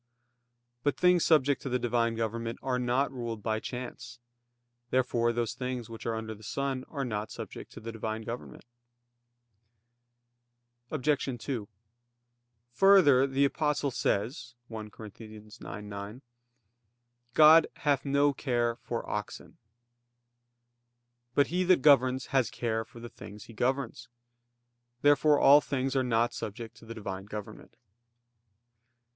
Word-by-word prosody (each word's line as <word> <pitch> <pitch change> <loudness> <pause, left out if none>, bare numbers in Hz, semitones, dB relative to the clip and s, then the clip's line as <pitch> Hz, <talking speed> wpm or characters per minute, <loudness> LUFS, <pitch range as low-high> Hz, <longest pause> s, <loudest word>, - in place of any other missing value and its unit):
But 145 +1 0
things 180 -2 +4
subject 145 -3 +3
to 135 - -4
the 125 - +1
Divine 120 -1 0
government 115 +1 -3
are 125 -1 0
not 125 +3 +1
ruled 115 -4 -5
by 110 -1 0
chance. 120 -1 -7 0.7
Therefore 120 -2 +1
those 120 -1 -2
things 125 -3 -5
which 115 - -7
are 115 - 0
under 110 0 -5
the 105 - -15
sun 135 +3 -3
are 140 -3 -3
not 105 -2 -3
subject - - -8
to - - -9
the 115 +1 -7
Divine 110 0 -4
government. 120 +3 -8 2.2
Obj. 140 -3 0
2: 115 -4 -4 1.0
Further, 145 -6 +6
the 135 +1 +2
Apostle 145 -1 0
says 120 +2 -2
(1 110 -2 -7
Cor. 110 +1 -10
9:9): 105 0 -9 1.1
"God 155 +1 +8
hath 145 -3 +1
no 140 0 +2
care 120 -4 -1
for 120 -1 -5
oxen." 105 -1 -6 1.8
But 145 - +4
he 180 +1 +2
that 180 -7 +4
governs 130 -3 +5
has 130 -3 +3
care 110 -2 -2
for 120 +1 -14
the 120 - -8
things 105 -2 -11
he 115 - -13
governs. 130 +2 -2 1.0
Therefore 145 +1 +5
all 145 +2 +7
things 135 -1 -2
are 135 - +3
not 120 -1 +1
subject 110 +2 -6
to - - -15
the 115 - -7
Divine 95 -3 -6
government. 105 0 -9
120 Hz, 130 wpm, -29 LUFS, 110-140 Hz, 2.2 s, God